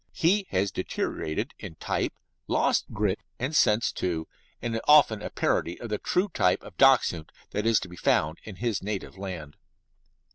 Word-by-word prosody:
He 190 +4 +2
has 95 +1 0
deteriorated 105 - -3
in 95 -6 -8
type, - - -2 0.3
lost - - +2
grit 105 -1 0 0.2
and 130 +5 -2
sense, 110 -4 +4
too, 80 -3 -2 0.3
and 120 -1 -3
is 115 - -1
often 140 -8 +6
a - - -4
parody 85 - 0
of 120 - -6
the 105 - -2
true 185 +3 +1
type 90 - +2
of - - -12
Dachshund 80 -3 +4 0.2
that 105 +2 -1
is 115 -2 +4
to - - -6
be 90 0 -12
found 80 0 +1
in 105 - -9
his 115 0 -1
native 100 -1 -4
land. 90 -7 -7
105 Hz, 175 wpm, -27 LUFS, 90-115 Hz, 0.3 s, often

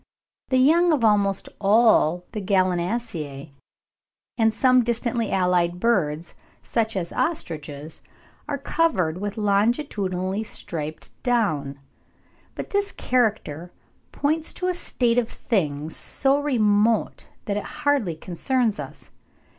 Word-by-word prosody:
The 260 - +3
young 330 +7 +5
of 260 -7 +2
almost 200 -2 +2
all 200 -5 +4
the 215 - -4
Gallinaceae, 180 - -1 0.8
and 225 -2 +3
of 220 - +2
some 255 0 +4
distantly 235 -1 -1
allied 180 -2 +1
birds 170 -7 0 0.3
such 225 -2 -1
as 170 -2 -3
ostriches, 155 - -4 0.5
are 285 -1 -2
covered 230 - 0
with 205 +1 -4
longitudinally 200 -3 0
striped 155 -7 -6
down; 155 - 0 0.8
but - - -6
this 405 0 0
character 210 - -1 0.4
points 310 +2 -1
back - - -12
to 365 - +1
a - - +1
state 245 -8 +1
of 230 - -2
things 155 - -2
so 275 +1 +1
remote 220 -5 +1 0.2
that 205 -1 -1
it 210 - -2 0.2
hardly 265 - +2
concerns 220 +7 -1
us. - - -9
210 Hz, 120 wpm, -24 LUFS, 175-245 Hz, 0.8 s, young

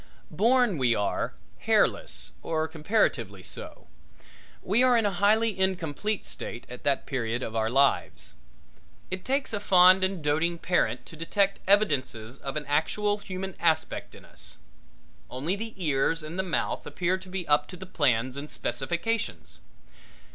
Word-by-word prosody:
Born, 230 - +3
we 120 -3 +3
are, 100 -9 -1 0.2
hairless - - +1
or 160 -1 -1
comparatively 140 - 0
so. - - -8 0.8
We 210 +6 +2
are 255 -1 +5
in 225 - +2
a 205 - +2
highly 210 +3 +3
incomplete 190 +2 -1
state 115 - -5
at 125 - -8
that 140 -1 +1
period 120 -2 -2
of 110 - -5
our 110 0 +1
lives. 135 +3 +1 0.8
It 185 0 -4
takes 270 -2 -1
a 205 - 0
fond 185 -1 +6
and 185 -3 -1
doting 160 +4 +1
parent 145 -9 0
to - - -12
detect 195 +5 +1
evidences 135 - +2
of 135 +1 -4
an 150 - -3
actual 205 +9 0
human 190 -1 -6
aspect 160 -2 0
in - - -14
us. - - -6 0.7
Only 145 +9 -2
the 225 +2 -6
ears 155 -1 +1
and 160 +4 -6
the - - +4
mouth 185 -3 -2
appear 185 +1 -1
to 185 0 -13
be 185 -1 -4
up 145 0 +3
to 180 - -9
the 190 - -8
plans 130 -7 +1
and 145 +2 -6
specifications. 190 - -2
170 Hz, 155 wpm, -27 LUFS, 135-195 Hz, 0.8 s, fond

